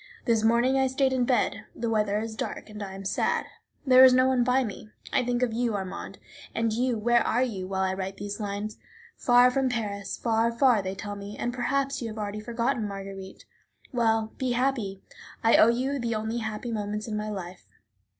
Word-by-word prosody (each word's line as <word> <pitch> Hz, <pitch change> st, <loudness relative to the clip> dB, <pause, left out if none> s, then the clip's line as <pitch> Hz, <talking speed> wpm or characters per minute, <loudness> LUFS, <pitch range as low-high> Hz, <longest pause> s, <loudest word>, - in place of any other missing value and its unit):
This 230 Hz, -3 st, +2 dB
morning 240 Hz, +4 st, +3 dB
I 265 Hz, -, +3 dB
stayed 265 Hz, 0 st, +1 dB
in 250 Hz, -1 st, +2 dB
bed. 240 Hz, -3 st, 0 dB
The 235 Hz, -, -3 dB
weather 210 Hz, -2 st, +1 dB
is 220 Hz, +1 st, -4 dB
dark, 220 Hz, -, -5 dB
I 205 Hz, -2 st, -7 dB
am 195 Hz, 0 st, -8 dB
sad; 190 Hz, -, 0 dB, 0.4 s
there 255 Hz, -1 st, +8 dB
is 260 Hz, -1 st, +8 dB
no 255 Hz, 0 st, +5 dB
one 255 Hz, -2 st, +3 dB
by 255 Hz, +2 st, +3 dB
me. 215 Hz, -1 st, -7 dB, 0.2 s
I 260 Hz, -, +3 dB
think 245 Hz, 0 st, 0 dB
of 235 Hz, -3 st, 0 dB
you, 235 Hz, -1 st, 0 dB
Armand. 190 Hz, -1 st, -5 dB, 0.4 s
And 230 Hz, -1 st, +1 dB
you, 245 Hz, +1 st, 0 dB
where 240 Hz, +2 st, +3 dB
are 245 Hz, +3 st, +1 dB
you, 195 Hz, -7 st, -3 dB
while 190 Hz, 0 st, -1 dB
I 190 Hz, 0 st, 0 dB
write 190 Hz, 0 st, -4 dB
these 205 Hz, +1 st, -5 dB
lines? 205 Hz, +1 st, -4 dB, 0.4 s
Far 245 Hz, 0 st, +5 dB
from 265 Hz, 0 st, +1 dB
Paris, 200 Hz, -5 st, -3 dB
far, 230 Hz, 0 st, +1 dB
far, 235 Hz, -2 st, +4 dB
they 190 Hz, 0 st, -4 dB
tell 205 Hz, +1 st, -6 dB
me, 200 Hz, +1 st, -8 dB
and 240 Hz, -, -2 dB
perhaps 275 Hz, +2 st, -1 dB
you 235 Hz, -, -3 dB
have 220 Hz, 0 st, -7 dB
already 210 Hz, 0 st, -4 dB
forgotten 235 Hz, +1 st, -1 dB
Marguerite. 195 Hz, -1 st, -8 dB, 0.5 s
Well, 225 Hz, -2 st, +1 dB
be 255 Hz, -2 st, 0 dB
happy; 240 Hz, -7 st, -1 dB, 0.4 s
I 225 Hz, -, +6 dB
owe 220 Hz, -, +7 dB
you 260 Hz, +4 st, 0 dB
the 235 Hz, -2 st, -1 dB
only 220 Hz, +2 st, -2 dB
happy 220 Hz, +1 st, -4 dB
moments 210 Hz, 0 st, -3 dB
in 215 Hz, -, -3 dB
my 210 Hz, 0 st, -3 dB
life. 185 Hz, -3 st, -7 dB
225 Hz, 205 wpm, -27 LUFS, 205-245 Hz, 0.5 s, there